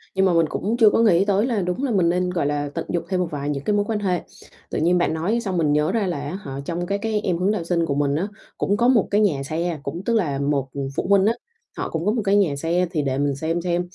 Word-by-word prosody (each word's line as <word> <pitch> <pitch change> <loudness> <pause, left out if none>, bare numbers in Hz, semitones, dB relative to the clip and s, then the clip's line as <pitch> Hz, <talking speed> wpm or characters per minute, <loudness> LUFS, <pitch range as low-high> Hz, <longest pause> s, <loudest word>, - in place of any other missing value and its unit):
Nhưng 190 0 +3
mà 185 - +3
mình 165 -1 +4
cũng 220 +4 -2
chưa 225 -3 +7
có - - +1
nghĩ 195 -5 +4
tới 205 +2 +2
là 230 -6 0
đúng 180 +9 -2
là 265 - 0
mình 180 -5 +3
nên, 180 +1 +1
gọi 170 -5 -1
là, 145 0 -1
tận 165 - -3
dụng 175 - -1
thêm 185 -1 0
một 180 - 0
vài 145 0 -3
những 140 -1 -3
cái 210 - +1
mối 205 0 +1
quan 215 -1 -1
hệ. 185 -3 0 0.5
Tự - - -1
nhiên 175 +3 +3
bạn 175 - +1
nói 180 +9 0
xong 190 -5 -2
mình 150 -3 +2
nhớ 150 +1 +2
ra 215 -4 0
là 175 - -2
á 150 +6 -4
hả, 135 -7 -6
trong 175 +2 -3
các 200 +2 -2
cái 215 -2 -1
em 180 -4 0
hướng 185 +3 +1
đạo 210 -5 -2
sinh 170 0 0
của 140 - -1
mình 140 -1 +1
á, 175 +6 -1 0.3
cũng 205 - +1
có 240 +3 +3
một 240 -6 +4
cái 205 +1 +3
nhà 150 -10 +1
xe, 165 +2 -2
cũng 170 - -4
tức 235 - +1
là 150 -11 0
một, 140 -1 0
ừm, 140 -1 -3
phụ - - -2
huynh 195 -1 +5
á, 225 - +3 0.4
họ - - -3
cũng 165 +1 -3
đúng 210 +3 +2
một 230 - 0
cái 200 +1 +3
nhà 185 -8 +3
xe. 170 +5 0
Thì 160 -4 0
để 135 -2 -1
mình 140 -1 0
xem 165 +4 -2
xem, 175 0 0
175 Hz, 310 wpm, -22 LUFS, 150-200 Hz, 0.5 s, chưa